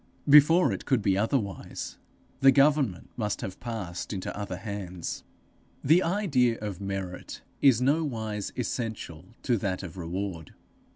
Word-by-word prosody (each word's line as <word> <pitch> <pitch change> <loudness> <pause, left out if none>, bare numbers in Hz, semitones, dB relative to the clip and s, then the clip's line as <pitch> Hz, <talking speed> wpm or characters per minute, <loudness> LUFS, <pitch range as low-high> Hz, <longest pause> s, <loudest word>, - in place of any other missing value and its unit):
Before 150 - +7
it 95 - -6
could 130 -6 +2
be 95 -2 +3
otherwise, 105 - -2 0.4
the 135 0 +7
government 140 - +2
must 105 -3 -2
have 95 - -6
passed 105 -8 -5
into 95 -3 -4
other 100 -3 -4
hands. 95 -4 -5 0.6
The 160 +6 +5
idea 155 - +2
of 100 -3 -6
merit 95 -2 -5 0.2
is 130 -4 +5
nowise 115 -8 -1
essential 110 -7 -4
to 120 -3 +2
that 95 -1 -2
of 90 0 -8
reward. 90 -1 -5
105 Hz, 130 wpm, -28 LUFS, 95-135 Hz, 0.6 s, Before